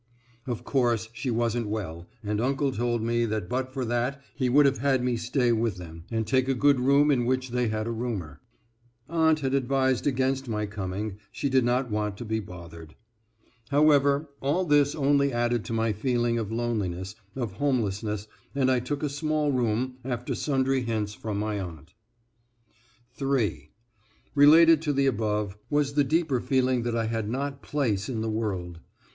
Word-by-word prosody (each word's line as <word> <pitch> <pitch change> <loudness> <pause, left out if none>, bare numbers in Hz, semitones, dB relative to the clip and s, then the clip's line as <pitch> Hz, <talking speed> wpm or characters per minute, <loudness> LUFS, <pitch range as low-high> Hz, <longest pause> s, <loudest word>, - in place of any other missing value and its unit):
Of 120 -3 -3
course, 120 -5 +1
she 130 - -4
wasn't 115 -1 0
well, 90 -5 -5
and 105 +1 -1
uncle 135 +2 +1
told 120 -1 -1
me 120 +1 +1
that 110 -4 -2
but 130 +4 -2
for 130 -1 -3
that 120 +4 -1
he 130 -3 0
would 145 +3 +5
have 135 -2 +2
had 130 -1 +2
me 125 -1 +1
stay 120 +1 +1
with 115 -4 0
them, 85 -2 -10
and 115 -1 -1
take 130 +4 +2
a 135 - +2
good 140 +1 +4
room 140 +3 +4
in 125 -3 +2
which 130 +1 0
they 125 -1 +1
had 110 0 -2
a 115 - -2
roomer. 110 - -4 0.7
Aunt 160 -2 +2
had 135 -1 -1
advised 130 0 +1
against 135 0 0
my 105 -2 -1
coming 100 0 -4
she 140 - -2
did 130 -1 +3
not 125 0 0
want 105 -1 -1
to 120 - -6
be 110 0 -1
bothered. 85 -5 -10 0.7
However, 145 0 +4
all 150 +7 +1
this 145 -2 +3
only 140 -1 +2
added 120 -1 0
to 115 - -4
my 115 -1 +1
feeling 120 +1 0
of 110 -2 -4
loneliness, 100 -6 -2 0.2
of 120 -6 -3
homelessness, 105 -6 -1 0.3
and 130 -2 +3
I 130 - +3
took 140 +5 -4
a - - +2
small 150 +1 0
room, 125 0 0
after 125 -1 -3
sundry 135 -2 +1
hints 110 -3 -2
from 105 -1 -4
my 105 0 -2
aunt. 85 -3 -8 1.2
(3) 115 - -1 0.6
Related 160 +2 +7
to 150 -3 0
the 140 0 +2
above, 105 -4 -1
was 145 -1 +1
the 145 0 +3
deeper 150 -2 +1
feeling 130 -2 +1
that 120 0 -2
I 115 -1 0
had 110 -1 -2
not 140 +3 -3
place 115 -9 -1
in 115 -4 -2
the 110 0 -1
world. 95 -6 -3
120 Hz, 175 wpm, -27 LUFS, 110-135 Hz, 1.2 s, Related